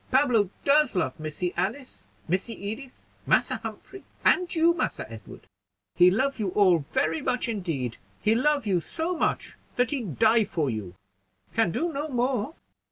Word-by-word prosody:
Pablo 250 -7 +3
does 290 -3 +4
love 180 -2 -1
Missy 155 +3 -3
Alice, 220 +10 -4 0.2
Missy 185 +7 -1 0.2
Edith, 255 +4 -8 0.2
Massa - - +3
Humphrey, 390 -1 -9 0.2
and 360 -2 +4
you, 335 +1 +4
Massa - - -2
Edward; - - -11 0.5
he 180 +1 +6
love 260 +7 0
you 210 - 0
all 185 -5 +5
very 155 +2 -1
much 250 0 0
indeed; 165 - -3 0.2
he 215 - +3
love 285 +2 +2
you 190 -4 +2
so 330 - -3
much - - -1 0.2
that 245 -1 +1
he 280 -3 -1
die 220 - +3
for 155 -9 -1
you! 100 -5 -6 0.6
Can 225 -5 +2
do 335 - -1
no 290 +2 -2
more." 255 +2 -1
225 Hz, 160 wpm, -26 LUFS, 180-280 Hz, 0.6 s, he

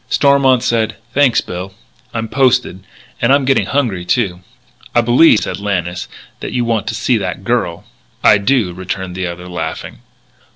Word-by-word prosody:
Stormont 140 -3 +3
said: 110 -2 0 0.2
"Thanks, 135 -5 +3
Bill; 90 +2 -7 0.4
I'm 115 -1 -3
posted.... 125 -7 +1 0.4
And - - +3
I'm 140 -1 +3
getting 135 0 +2
hungry, 120 -11 -1
too." 90 -2 0 0.6
"I 120 - +5
believe," 120 +1 +5
said - - -4
Lannis, 90 -4 -2 0.3
"that - - -6
you 120 -1 0
want 115 -3 -1
to - - -2
see 125 - +1
that 90 -4 -4
girl." - - -1 0.4
"I 105 - +6
do," 100 -3 +1
returned 95 0 -5
the 90 0 -3
other, 90 +1 -7
laughing. 80 -3 -5
110 Hz, 160 wpm, -16 LUFS, 90-125 Hz, 0.6 s, I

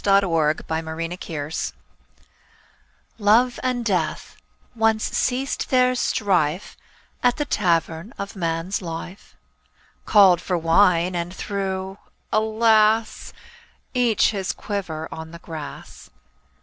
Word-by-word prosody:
THE 170 -6 +3
EXPLANATION 160 -1 -4 1.5
Love 230 +4 +3
and 250 -2 -1
Death 195 -5 -1 0.4
once 225 -1 +2
ceased 260 +2 -1
their 255 -1 +4
strife 185 -8 0 0.5
At 245 0 +2
the 295 - -1
Tavern 170 - 0
of 200 +1 -6
Man's 165 +2 -2
Life. 175 +2 -8 0.7
Called 190 -5 +6
for 180 -1 -1
wine, 170 +1 +3
and 170 0 -3
threw 190 0 -4 0.2
— - - -18
alas! 220 0 +2 0.3
— - - -26 0.3
Each 245 -5 +3
his 195 -3 -2
quiver 165 -6 -4
on 160 0 -7
the 170 - -10
grass. 160 -3 -9
190 Hz, 105 wpm, -23 LUFS, 165-220 Hz, 1.5 s, Called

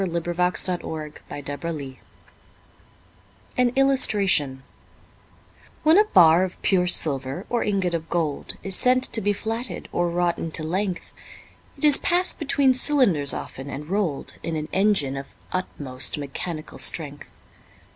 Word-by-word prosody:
William 170 -3 -2
Cowper 175 +1 0
The 160 -4 -2 0.3
Flatting 145 +1 -5 0.2
Mill 135 -2 -8 1.6
An 250 -1 +3
Illustration 200 - +3 1.2
WHEN 315 +5 +6
a 425 - +5
bar 175 - +5
of 185 -1 -5
pure 180 -2 +2
silver 140 0 +1
or 240 - +1
ingot 195 -4 0
of 165 -1 -4
gold 160 -4 -3
Is 195 -1 0
sent 255 +3 +4
to 225 - -1
be 205 +1 +1
flatted 225 +4 -4
or 175 0 0
wrought 175 0 0
into 160 -1 -2
length, 185 +3 -3 0.6
It - - -12
is 295 -2 +6
pass'd 355 +1 +1
between 280 -3 +2
cylinders 250 - +3
often, 135 +2 -6
and 150 +4 -7
roll'd 195 -8 -2
In 165 - -4
an 155 0 -4
engine 190 -9 +1
of 135 - -7 0.3
utmost 145 -9 -1
mechanical 155 +3 -6
strength. 145 -3 -1
175 Hz, 135 wpm, -23 LUFS, 150-210 Hz, 1.6 s, WHEN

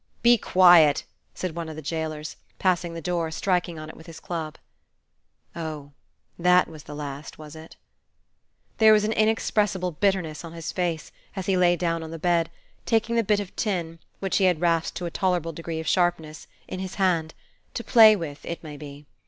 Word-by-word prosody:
"Be 240 0 +7
quiet!" 175 -8 +5 0.3
said 185 -3 -4
one 170 -1 -5
of 155 - -7
the 155 - -7
jailers, 155 -1 -4 0.2
passing 175 -2 0
the 165 - -6
door, 170 -1 -1
striking 175 0 -1
on 155 0 -7
it 155 - -10
with 160 - -15
his 165 -2 -10
club. 160 -3 -5 1.0
Oh, 155 -4 -6 0.5
that 180 +1 +4
was 155 -2 -12
the 150 - -8
last, 145 0 -7
was 155 0 -11
it? 160 +1 -12 1.0
There 220 -1 +7
was 210 -1 +4
an 215 - 0
inexpressible 210 -4 +1
bitterness 175 -3 -1
on 165 -1 -9
his 165 -1 -5
face, 170 -3 -2 0.2
as 190 -2 -4
he 195 - +1
lay 175 -1 +4
down 165 -1 -1
on 160 - -7
the 165 - -6
bed, 170 0 +1 0.3
taking 225 0 +1
the 230 - +3
bit 210 0 +2
of 200 -3 -7
tin, 170 -7 -2 0.2
which 195 -1 -1
he 195 - +3
had 180 -4 +2
rasped 165 -1 0
to 180 - -4
a 170 - -4
tolerable 175 -3 -1
degree 165 0 -5
of 160 - -5
sharpness, 175 -4 0 0.2
in 185 - -6
his 190 0 -5
hand, 170 -5 0 0.4
to 235 - -3
play 220 -3 +7
with, 155 -6 -6
it 170 - -6
may 150 -2 -8
be. 145 0 -10
170 Hz, 195 wpm, -25 LUFS, 160-185 Hz, 1.0 s, Be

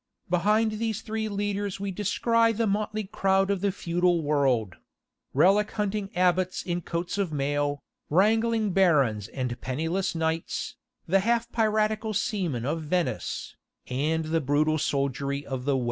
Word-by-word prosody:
Behind 215 +4 +2
these 225 -2 -2
three 220 0 -3
leaders 205 -1 -2
we 200 0 -3
descry 230 +4 +2
the 230 +1 0
motley 215 +1 -1
crowd 195 0 +1
of 195 -2 -1
the 200 0 +1
feudal 175 -2 +1
world; 135 -10 +1 0.5
relic 195 +9 +4
hunting 210 -1 -2
abbots 180 0 +2
in 175 -1 -2
coats 175 +4 -3
of 190 -5 0
mail, 145 0 -1 0.3
wrangling 220 +4 +3
barons 140 - +3
and 125 -2 -4
penniless 165 +8 -1
knights, 160 0 -2 0.3
the 195 +4 +3
half 235 +3 0
piratical 215 -1 +1
seamen 175 - -1
of 160 +4 -1
Venice, 170 +3 -2 0.3
and 155 +5 0
the 160 +1 0
brutal 155 +3 +2
soldiery 140 0 -1
of 130 -2 -5
the 140 -2 +2
West. - - 0
180 Hz, 145 wpm, -27 LUFS, 145-210 Hz, 0.5 s, relic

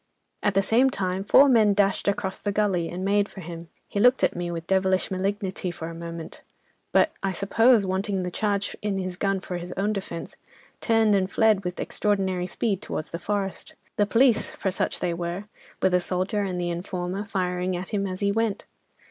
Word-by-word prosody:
At 205 -2 +1
the 195 - +4
same 245 +6 +4
time 190 -5 -2
four 275 +7 +7
men 220 -6 +5
dashed 200 -1 +1
across 195 -1 -1
the 205 - -2
gully 195 -5 +1
and 185 +2 -4
made 205 0 +2
for 195 - -10
him. 170 0 -8 0.2
He 200 - -3
looked 250 +4 +5
at - - +2
me 175 0 -3
with 165 -1 -5
devilish 190 0 +1
malignity 190 -1 -2
for 165 -1 -6
a - - -7
moment, 165 -1 -8 0.5
but - - +4
I 195 -1 -1
suppose, 220 +4 +4
wanting 190 0 -1
the 180 - -3
charge 200 0 -1
in 205 -2 -1
his 185 -1 -3
gun 195 +1 0
for 180 -1 -4
his 175 +1 -6
own 205 +2 0
defence, 190 -4 -6 0.4
turned 225 -2 +3
and 190 -1 +2
fled 215 -2 +3
with 180 0 -4
extraordinary 190 -3 0
speed 200 -1 -1
towards 155 - -5
the 170 - -4
forest, 200 0 -3 0.2
the 205 - +2
police—for 230 -4 +2
such - - -1
they 175 - 0
were—with 180 +2 -4
a 180 - +5
soldier 185 +3 -1
and 185 -3 -2
the 175 0 -1
informer, 180 +2 -3
firing 185 -2 -1
at 180 +1 -6
him 200 -2 -1
as 185 +1 -5
he 200 0 +2
went. 225 -1 -1
195 Hz, 195 wpm, -25 LUFS, 180-205 Hz, 0.5 s, four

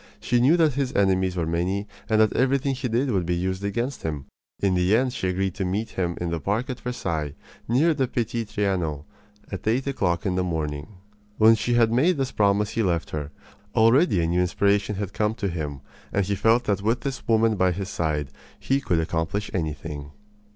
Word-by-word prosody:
She 120 0 +1
knew 145 +8 +5
that 160 -4 +3
his 135 -1 -1
enemies 95 -2 +2
were 85 -2 -1
many 90 +5 -1 0.2
and 110 -1 +3
that 110 0 +4
everything 135 +1 +1
he 130 0 -3
did 125 +3 0
would 95 -4 +1
be 90 +1 -1
used 95 +2 -2
against 120 +6 -2
him. 75 -4 -4 0.3
In 100 -2 +2
the 90 +3 +3
end 130 0 0
she 95 - -2
agreed 95 0 -1
to 95 - -3
meet 100 +5 -2
him 85 -2 -2
in 85 -1 -2
the 85 - -1
park 110 - -1
at 125 - -6
Versailles, 80 - -3 0.3
near 145 +8 +3
the 135 -4 0
Petit 115 -1 -2
Trianon, 95 -9 -1 0.5
at 95 +1 -6
eight 120 +4 +1
o'clock 90 -11 -1
in 95 - +1
the 90 0 0
morning. 75 -4 -3 0.5
When 110 +1 +7
she 120 +2 0
had 115 -1 +4
made 150 +9 +3
this 135 -2 -1
promise 105 0 +2
he 115 - 0
left 85 -5 0
her. 75 -2 -4 0.5
Already 115 - +4
a - - +1
new 85 +2 +1
inspiration 100 +3 +1
had 100 -1 -4
come 105 +1 0
to 100 -3 -2
him, 75 -5 -4 0.3
and 100 -1 +1
he 100 - -1
felt 115 +5 +3
that 100 -3 0
with 115 +4 0
this 135 -2 -5
woman 115 -1 +3
by 95 -2 +2
his 95 +2 -4
side 75 -7 -1 0.3
he 135 +1 0
could 85 -10 +1
accomplish 80 +5 -2
anything. 75 -3 -4
100 Hz, 205 wpm, -25 LUFS, 85-120 Hz, 0.5 s, When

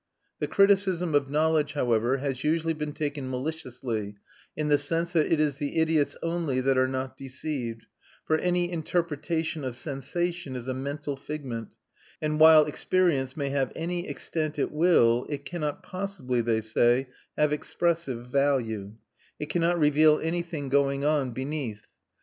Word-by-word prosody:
The - - -1
criticism 195 -4 +3
of 140 -2 +2
knowledge, 155 0 +2
however, 120 -2 +1
has 135 -1 -3
usually 165 +1 +1
been 150 -1 -4
taken 145 -3 -3
maliciously, 125 -6 -4 0.4
in 155 -1 -1
the 145 -1 +4
sense 165 +4 -1
that 160 -3 +2
it 165 - +3
is 150 -3 +1
the 145 +1 -3
idiots 160 -2 +2
only 165 -6 0
that 135 +1 +2
are 130 0 +3
not 130 0 -3
deceived; 130 -4 -5 0.4
for 155 0 +2
any 175 0 +1
interpretation 165 -1 -2
of 125 -2 -4
sensation 155 +2 -3
is 125 0 -6
a 130 - -1
mental 140 +2 -4
figment, 135 -6 -6 0.4
and 150 0 -1
while 155 -1 +8
experience 150 -4 0
may 140 -2 -1
have 135 -2 0
any 175 +2 -3
extent 155 -2 -3
it 145 - 0
will 150 -8 +4
it 145 -1 -5
cannot 170 +1 -4
possibly, 185 -11 -2
they 115 -1 +1
say, 120 +4 +2 0.3
have 150 -1 +3
expressive 150 -6 -1
value; 125 -6 0 0.4
it 150 - -5
cannot 175 0 +2
reveal 150 0 +5
anything 165 -3 -3
going 140 +1 +1
on 150 -3 +2
beneath. 130 -4 -4
145 Hz, 150 wpm, -27 LUFS, 130-160 Hz, 0.4 s, while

